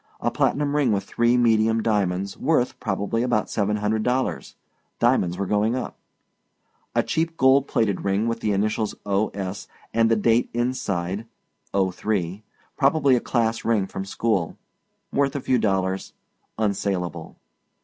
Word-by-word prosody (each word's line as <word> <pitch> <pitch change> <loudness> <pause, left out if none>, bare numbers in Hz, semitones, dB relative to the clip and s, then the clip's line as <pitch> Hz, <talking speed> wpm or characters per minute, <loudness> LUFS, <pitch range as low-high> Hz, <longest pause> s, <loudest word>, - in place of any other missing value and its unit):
A - - 0
platinum 145 0 +1
ring 140 -5 +3
with 100 -1 0
three 120 +4 +2
medium 110 -1 +3
diamonds, 100 -3 0
worth, 135 -4 0
probably, 105 +2 -1
about 120 -3 0
seven 105 0 0
hundred 105 +1 0
dollars. 125 +3 -1 0.4
Diamonds 105 -8 +2
were 100 - -1
going 105 +4 +1
up. 130 - -4 1.0
A - - +3
cheap 165 0 -1
gold 135 +1 +4
plated 100 -4 0
ring 100 +3 +1
with 115 0 -1
the 105 - 0
initials 105 +2 0
O. 100 +1 +1
S. 95 0 -5 0.3
and 115 0 +3
the 115 - +4
date 115 +2 +2
inside 110 -5 -2 0.4
'03 95 0 -1 0.3
probably 140 -1 +3
a - - +2
class 115 -2 0
ring 110 -4 +2
from 95 0 -5
school. 100 -3 -1 0.6
Worth 140 0 +1
a - - 0
few 130 -1 +1
dollars. 95 -2 -1 0.4
Unsalable. 95 -6 -2
110 Hz, 145 wpm, -24 LUFS, 100-120 Hz, 1.0 s, gold